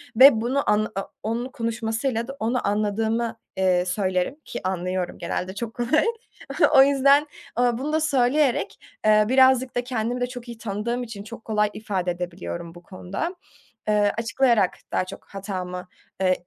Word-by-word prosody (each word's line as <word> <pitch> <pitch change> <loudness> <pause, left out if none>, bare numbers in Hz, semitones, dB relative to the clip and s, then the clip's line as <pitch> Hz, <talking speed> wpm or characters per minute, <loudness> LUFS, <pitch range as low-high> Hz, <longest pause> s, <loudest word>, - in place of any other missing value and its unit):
ve 260 -2 +8
bunu 260 +3 0
anla 210 +1 +2
o 195 - -3
onun 235 +4 -2
konuşmasıyla 230 -1 -2
da 270 - -7
onu 235 +1 0
anladığımı, 220 +3 0 0.2
ııı, 180 -1 +3
söylerim 185 +4 0
ki - - -5
anlıyorum, 185 -1 -2
genelde 180 +2 -3
çok 225 +1 -4
kolay. 240 +6 +2 0.7
O 270 - +10
yüzden, 280 +1 +4 0.3
ııı, 240 -1 +3
bunu 295 +4 -3
da 315 - +3
söyleyerek, 275 -2 +2 0.3
ııı, 215 0 +5
birazcık 260 -1 +4
da 245 - 0
kendimi 245 0 -2
de 245 - +1
çok 245 -1 -9
iyi 235 -1 -8
tanıdığım 230 +3 -3
için 220 -4 -8
çok 225 +1 -10
kolay 210 -1 +1
ifade 190 -4 -2
edebiliyorum 170 - -6
bu 175 - -13
konuda. 195 - -5 0.5
Iıı, 205 -1 +3
açıklayarak 230 -3 +2 0.2
daha 185 - +1
çok - - -10
hatamı, 185 -2 -5 0.4
ııı, 185 0 +4
225 Hz, 155 wpm, -24 LUFS, 195-250 Hz, 0.7 s, O